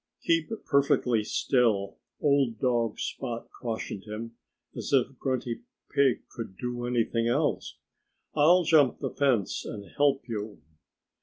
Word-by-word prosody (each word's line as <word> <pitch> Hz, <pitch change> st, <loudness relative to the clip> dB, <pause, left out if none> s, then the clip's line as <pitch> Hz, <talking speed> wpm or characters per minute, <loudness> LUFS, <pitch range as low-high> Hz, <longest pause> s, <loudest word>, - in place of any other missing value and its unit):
"Keep 165 Hz, -2 st, +2 dB, 0.2 s
perfectly 135 Hz, -6 st, +2 dB
still!" 105 Hz, -5 st, +1 dB, 0.2 s
old 140 Hz, -6 st, +2 dB
dog 120 Hz, -4 st, +1 dB
Spot 120 Hz, -3 st, -4 dB
cautioned 110 Hz, -4 st, -4 dB
him 110 Hz, +2 st, -6 dB, 0.4 s
as -, -, -5 dB
if 135 Hz, -1 st, +2 dB
Grunty 125 Hz, -3 st, -2 dB, 0.3 s
Pig 140 Hz, -3 st, +2 dB
could 110 Hz, -5 st, -8 dB
do 120 Hz, -1 st, -3 dB
anything 115 Hz, -1 st, +1 dB
else. 120 Hz, -, 0 dB, 0.6 s
"I'll 170 Hz, +5 st, +5 dB
jump 150 Hz, -6 st, +4 dB
the -, -, -3 dB
fence 125 Hz, -9 st, +1 dB
and 100 Hz, -3 st, -7 dB
help 140 Hz, -2 st, +2 dB
you." 105 Hz, -2 st, -5 dB
120 Hz, 125 wpm, -28 LUFS, 115-140 Hz, 0.6 s, I'll